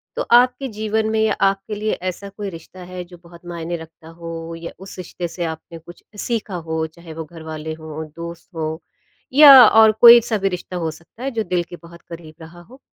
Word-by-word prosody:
तो - - -2
आपके 250 +2 +4
जीवन 220 -1 -2
में 220 0 0
या 220 - +2
आपके 195 +2 0
लिए 215 +1 -2 0.2
ऐसा 200 +2 -8
कोई 200 0 -6
रिश्ता 180 +1 -12
है 180 0 -7
जो 175 0 -15
बहुत 170 0 -16
मायने 170 0 -5
रखता 160 0 -14
हो? 165 0 -8
या 165 0 -8
उस 190 +1 -11
रिश्ते 180 -1 -6
से 175 +1 -6
आपने 160 +1 -7
कुछ 175 +2 -15 0.2
सीखा 220 -5 -3
हो? 160 -1 -3
चाहे 165 0 -13
वो 160 0 -7
घरवाले 160 -1 -7
हों, 155 0 -8
दोस्त 170 0 -9
हों, 160 0 -3 0.6
या 275 -3 +10
और 220 0 +6
कोई-सा 235 -1 +8
भी 195 -1 0
रिश्ता 180 0 -6
हो 165 -2 -2
सकता 170 +9 -14
है 270 - -2
जो 225 -3 -2
दिल 180 -2 -1
के 175 - -11
बहुत 170 0 -15
करीब 165 -2 -12
रहा 165 +2 -12
हो? 250 +10 -17
175 Hz, 210 wpm, -20 LUFS, 165-215 Hz, 0.6 s, या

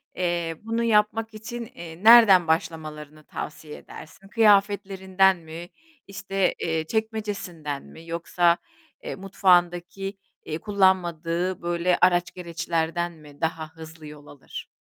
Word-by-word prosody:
Eee, 170 -2 -1
bunu 230 +1 -1
yapmak 225 0 +2
için, 235 +2 -7
eee, 170 +1 -10
nereden 215 -6 +8
başlamalarını 155 -2 -3
tavsiye 150 0 -8
edersin? 175 +5 -13
Kıyafetlerinden 195 -3 +3
mi, 165 +1 -10 0.4
işte, 195 -1 -1
eee, 160 -1 -1
çekmecesinden 205 -10 -3
mi 165 +1 -14
yoksa, 170 +1 +1 0.5
eee, - - -5
mutfağındaki, 190 0 +1 0.3
eee, 155 - -3
kullanmadığı 180 -3 0
böyle 175 +1 +1
araç 175 -1 +3
gereçlerden 170 -1 -2
mi 150 -3 -16
daha 160 -1 -2
hızlı 160 -1 -11
yol 150 -1 -12
alır? 140 - -10
175 Hz, 115 wpm, -25 LUFS, 160-195 Hz, 0.5 s, nereden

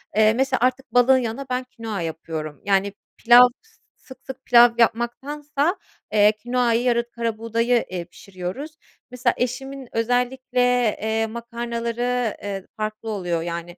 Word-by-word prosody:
eee, 215 0 +5
mesela, 265 +2 0
artık 255 -1 0
balığın 250 +2 +5
yanına 250 +2 -3
ben 250 0 -1
kinoa 225 -6 -6
yapıyorum, 160 -2 -5
yani, 200 0 +1 0.2
pilav 245 +1 +8 0.5
sık 260 - -14
sık 265 - -9
pilav 240 0 +7
yapmaktansa, 280 - 0 0.4
eee, 210 0 +6
kinoayı 240 +1 0
yara 240 -1 +2
karabuğdayı, 230 +1 0
eee, 180 -1 -4
pişiriyoruz. 185 - -7 0.4
Mesela, 250 0 +1
eşimin 265 +2 -4
özellikle, 250 +2 0 0.4
eee, 220 +1 0
makarnaları, 235 0 -3
eee, 195 -2 -5
farklı 215 +1 -4
oluyor, 175 -5 -2
yani, 170 +1 -6
235 Hz, 125 wpm, -22 LUFS, 215-250 Hz, 0.5 s, pilav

